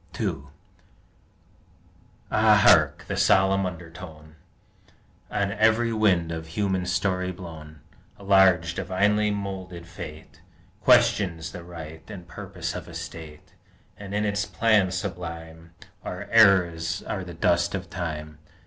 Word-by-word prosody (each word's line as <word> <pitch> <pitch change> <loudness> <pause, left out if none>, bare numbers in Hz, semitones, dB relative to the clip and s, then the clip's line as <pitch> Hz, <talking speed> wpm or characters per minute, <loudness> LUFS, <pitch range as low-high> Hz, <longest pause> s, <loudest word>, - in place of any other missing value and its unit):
II - - +1
1 70 +1 -11 1.8
Ah, - - +5
hark! - - +5
the - - -3
solemn 95 0 +3
undertone, 80 -3 -10 0.9
On 100 0 -1
every 115 +2 +2
wind 95 -7 +2
of 80 -1 -5
human 95 +1 -1
story 90 0 0
blown. 80 -4 -11 0.4
A 100 - -14
large, 95 -4 +4
divinely 105 +3 +1
moulded 95 -4 -5
Fate 80 -2 -10 0.4
Questions 85 -5 +3
the 90 - -9
right 80 -2 -9
and 90 -5 -9
purpose 80 - -6
of - - -7
a - - -11
State, 75 -2 -9 0.4
And 100 0 -7
in 105 +1 0
its 100 0 0
plan 110 -3 +2
sublime 85 -3 -6 0.3
Our 90 - -6
eras 90 -6 +4
are 95 - -4
the 90 -2 -9
dust 85 +2 +1
of 95 -2 -5
Time. 75 -4 -6
90 Hz, 125 wpm, -25 LUFS, 80-100 Hz, 1.8 s, Ah